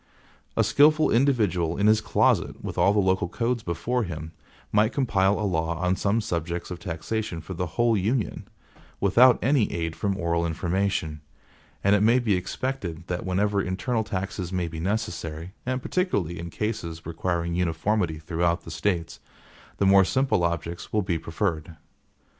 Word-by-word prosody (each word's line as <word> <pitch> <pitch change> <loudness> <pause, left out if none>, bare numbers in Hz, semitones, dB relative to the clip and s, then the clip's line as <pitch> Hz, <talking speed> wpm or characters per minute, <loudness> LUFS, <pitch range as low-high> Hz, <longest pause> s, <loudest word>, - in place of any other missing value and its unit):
A - - +5
skillful 155 +2 +4
individual 110 - +2
in 100 - +1
his 110 +1 +5
closet - - +1
with - - -5
all 95 +3 +4
the 105 - 0
local 95 -3 +2
codes 120 +3 -1
before 105 +8 -1
him, 80 -6 -5 0.4
might 105 +2 +3
compile 100 -7 +2
a 105 - -1
law 85 -3 -1
on 90 +2 +1
some 100 +4 +1
subjects 85 -4 -3
of 90 - -5
taxation 90 +2 -3
for 80 +4 -7
the 90 0 -2
whole 120 -1 +3
union, 110 +4 -1 0.5
without 120 +6 +6
any 130 -4 +2
aid 80 -1 -3
from 100 +4 -1
oral 85 -1 0
information, 85 -2 -1 0.6
and 100 +1 +5
it 100 - +2
may 115 +4 +5
be 120 -5 +1
expected 90 -3 -3
that 90 +1 -3
whenever 100 +2 +1
internal 110 +6 -1
taxes 95 -3 -4
may 90 -2 -1
be 80 -1 -7
necessary, 90 -4 -3
and 130 0 -1
particularly 100 - -1
in 85 0 -6
cases 85 -5 -4
requiring 85 +1 -2
uniformity 90 +1 0
throughout 85 +2 -1
the - - -9
States, 85 -5 -2 0.6
the 100 - +1
more 95 0 +7
simple 130 -3 +1
objects 85 0 -3
will 105 -1 +1
be 90 -3 -1
preferred. 80 -2 -3
95 Hz, 160 wpm, -25 LUFS, 85-110 Hz, 0.6 s, more